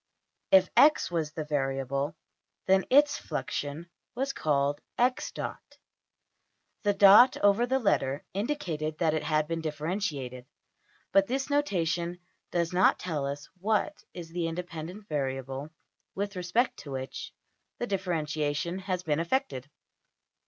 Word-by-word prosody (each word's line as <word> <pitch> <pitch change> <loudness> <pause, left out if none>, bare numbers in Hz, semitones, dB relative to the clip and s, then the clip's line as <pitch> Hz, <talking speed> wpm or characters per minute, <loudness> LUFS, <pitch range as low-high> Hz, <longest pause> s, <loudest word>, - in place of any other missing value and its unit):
If 190 -1 +6
$x$ 295 - +5
was 160 -3 -1
the 160 - -3
variable, 140 0 -1 0.5
then 190 0 +4
its 290 +2 +5
fluxion 145 +5 -4 0.2
was 270 +2 -1
called~$\dot{x}$. 145 - 0 1.5
The 205 -2 +2
dot 200 +5 +8
over 205 +4 +3
the 260 +2 +2
letter 140 - 0
indicated 175 - -2
that 160 -2 +2
it 155 - 0
had 155 0 +1
been 165 0 -2
differentiated. 150 - -3 0.6
But 195 0 +4
this 270 +3 -2
notation 175 - 0 0.3
does 170 0 -1
not 185 +1 +4
tell 155 -6 -3
us 140 +1 -5
what 215 +9 +1 0.2
is 170 -2 -8
the 170 0 -2
independent 175 +3 -6
variable 135 -1 -3 0.5
with 200 +1 -3
respect 180 +8 0
to 145 - -9
which 130 0 -5 0.5
the - - -2
differentiation 170 -3 -1
has 185 -1 -3
been 150 -2 0
effected. 165 - -1
170 Hz, 125 wpm, -29 LUFS, 150-200 Hz, 1.5 s, dot